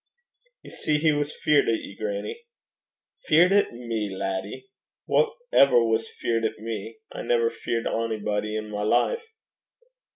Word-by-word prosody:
'Ye - - -12
see 150 - 0
he 155 +1 +3
was 145 0 -1
feart 150 -2 +2
at 115 - +3
ye, 100 - -10
grannie.' 105 - -5 0.8
'Feart 170 +4 +6
at 205 +1 +3
me, 115 -3 -3
laddie! 95 +5 -4 0.4
Wha 460 - +3 0.2
ever 125 -4 +6
was 115 0 0
feart 115 -1 -2
at 110 0 -1
me? 110 - -6
I - - -6
never 470 -2 +2
feart 115 - -3
onybody 105 -1 -1
i' - - -1
my 105 -1 -5
life.' 455 - +1
115 Hz, 150 wpm, -25 LUFS, 105-150 Hz, 0.8 s, Feart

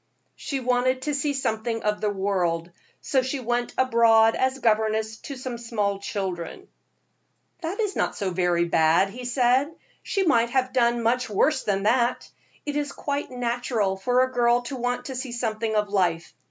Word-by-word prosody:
"She 275 - -4
wanted 255 +1 +1
to 295 - -1
see 285 +1 0
something 225 -3 -2
of 210 0 -1
the 210 - +1
world, 180 -4 -1 0.3
so 265 - +1
she 260 +2 -3
went 240 0 -2
abroad 230 -3 +5
as 260 +1 0
governess 220 -2 +1
to 280 - -8
some 255 -2 -5
little 210 -4 -2
children." 190 - -5 0.9
"That 340 +4 -3
was 420 -3 -1
not - - -1
so 195 -2 -2
very 175 -1 +1
bad," 165 +3 +3
he 250 +3 -8
said. 250 +4 +2 0.3
"She 390 -2 -1
might 235 -7 +3
have 255 0 0
done 235 -1 +2
much 250 +2 +1
worse 285 +9 +2
than 195 -2 0
that. 240 +3 +1 0.4
It 290 -1 -3
is 295 -1 -2
quite 285 0 -3
natural 240 -5 -1
for 245 +6 +2
a 260 - -2
girl 240 -1 +3
to 270 +3 -5
want 245 0 -2
to 265 - -5
see 255 0 -5
something 225 -2 -2
of 210 -1 +1
life. 175 -4 0
235 Hz, 175 wpm, -25 LUFS, 210-255 Hz, 0.9 s, abroad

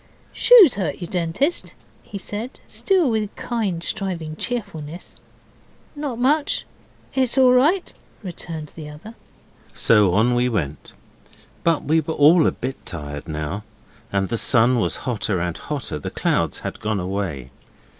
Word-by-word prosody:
'Shoes 445 - +7
hurt 175 -8 -2
you, 175 - -4
Dentist?' 180 - -1 0.3
he 200 - -8
said, 210 +6 -6
still 375 -6 +1
with 215 -2 -2
kind 205 -8 -2
striving 170 -6 -2
cheerfulness. 180 -8 -6 0.8
'Not 290 -5 -4
much 285 +5 +1 0.5
it's 260 -1 +1
all 260 -1 +6
right,' 315 +9 +3 0.3
returned 165 -4 -6
the 155 -2 -8
other. 155 +10 -11 0.6
So 105 -5 +4
on 115 +4 +3
we 125 +1 +2
went 75 - -3 0.7
but 165 -2 +2
we 160 +2 +2
were 160 +1 -4
all 155 +3 +6
a - - +3
bit 130 +2 -6
tired 75 -2 -7
now 80 +6 -4 0.5
and 95 -1 0
the 115 - 0
sun 120 +1 +4
was - - 0
hotter 105 -6 -1
and 85 0 -2
hotter; 140 - -4
the - - -5
clouds - - 0
had - - -4
gone 110 -1 -1
away. 90 -9 -4
155 Hz, 145 wpm, -22 LUFS, -, 0.8 s, Shoes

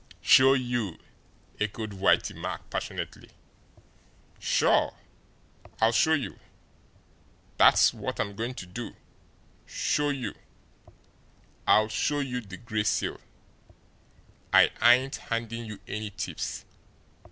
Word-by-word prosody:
"Show 130 +1 +7
you!" 120 -8 -1 0.6
echoed 105 0 -3
Whitey 95 0 +2
Mack - - -6
passionately. - - -5 1.1
"Sure, - - +2 0.8
I'll 110 +1 +4
show 120 +8 +3
you! 150 -4 -2 1.2
That's - - +6
what - - -5
I'm 100 - -2
going 120 +4 -4
to 90 - -7
do 115 +7 -7 0.7
show 150 0 0
you. 135 -4 -3 1.3
I'll 110 0 +5
show 145 +7 -1
you 130 -3 -2
the 100 -5 -10
Gray 110 -1 -2
Seal! - - -1 1.3
I - - +6
ain't 125 +3 +5
handing 115 0 -4
you 105 -2 -8
any 105 0 -4
tips. 100 - -5
115 Hz, 105 wpm, -27 LUFS, 105-130 Hz, 1.3 s, Show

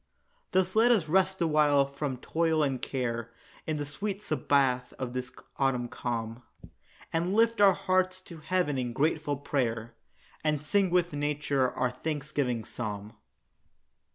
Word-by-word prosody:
Thus 185 0 +1
let 225 +2 +5
us 210 -10 +3
rest 190 +3 +2
awhile 150 -3 +4
from 140 -1 -4
toil 160 +3 +1
and 135 -3 -1
care, 120 -3 -2 0.4
In 155 -1 -1
the 145 - -3
sweet 200 +7 -4
sabbath 135 -3 +1
of 125 -2 -4
this 125 0 -4 0.3
autumn 130 -3 +1
calm, 115 -1 -4 0.7
And 170 +4 0
lift 230 -1 +3
our 195 -2 +8
hearts 185 +1 +1
to 170 -3 -11
heaven 155 -3 0
in 120 -2 -2
grateful 150 +1 0
prayer, 120 -5 -2 0.5
And 150 -2 0
sing 195 +5 +2
with 175 -2 +1
nature 145 -2 0
our 125 -1 0
thanksgiving 140 -4 -2
psalm. 105 -2 -5
145 Hz, 140 wpm, -29 LUFS, 125-175 Hz, 0.7 s, our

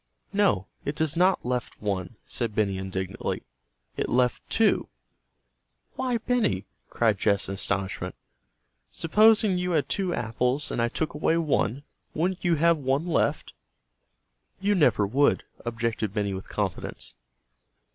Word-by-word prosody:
"No, 195 - +3 0.2
it 145 - -3
does 160 0 0
not 180 -2 +3
left 125 0 -2
one," 100 +1 -3
said 115 -4 -2
Benny 100 -3 +1
indignantly. 95 0 -3 0.5
"It - - -2
left 125 0 +2
two." - - +3 1.0
"Why, 255 -2 0
Benny!" 225 - 0 0.2
cried 110 -4 +1
Jess 100 0 +2
in 95 - -3
astonishment. 95 -2 -2 0.7
"Supposing 210 +2 +4
you 180 0 -1
had 145 -4 +1
two 190 -3 0
apples 125 +3 0
and - - -1
I 120 - +2
took 155 +6 -2
away 160 +2 +1
one, 145 -4 0 0.3
wouldn't 180 +3 -1
you 175 -2 +3
have 165 +2 +4
one 135 +3 0
left?" 175 - 0 1.1
"You 200 +2 +2
never 125 - +4
would," 135 +8 +2 0.2
objected 115 -3 -2
Benny 100 -1 0
with 95 0 -7
confidence. - - -3
130 Hz, 135 wpm, -26 LUFS, 105-175 Hz, 1.1 s, Supposing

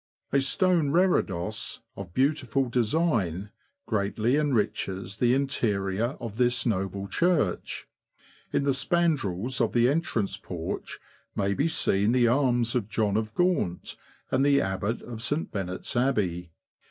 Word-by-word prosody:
A 140 - +4
stone 170 +2 +2
reredos, 110 - 0
of 95 -2 -8
beautiful 135 -2 +1
design, 115 - 0 0.3
greatly 110 +3 0
enriches 105 -8 -1
the 120 +2 +3
interior 115 -4 -1
of 115 -3 -7
this 125 0 +2
noble 100 -3 -1
church. 165 - 0 0.6
In - - +1
the 140 -1 +2
spandrels 130 - 0
of 115 - +1
the 120 0 +4
entrance 135 - 0
porch 85 -3 -6 0.4
may 100 0 +1
be 140 +10 +1
seen 105 -8 +2
the 125 -2 +4
arms 120 -2 +2
of 110 -5 -1
John 105 -2 0
of 110 0 -2
Gaunt, 175 - 0 0.4
and 130 +1 +2
the 140 0 +4
Abbot 95 +4 -2
of 115 -2 -7
St. 145 +7 -1
Benet's 95 0 -3
Abbey. 100 -9 0
120 Hz, 130 wpm, -27 LUFS, 100-140 Hz, 0.6 s, A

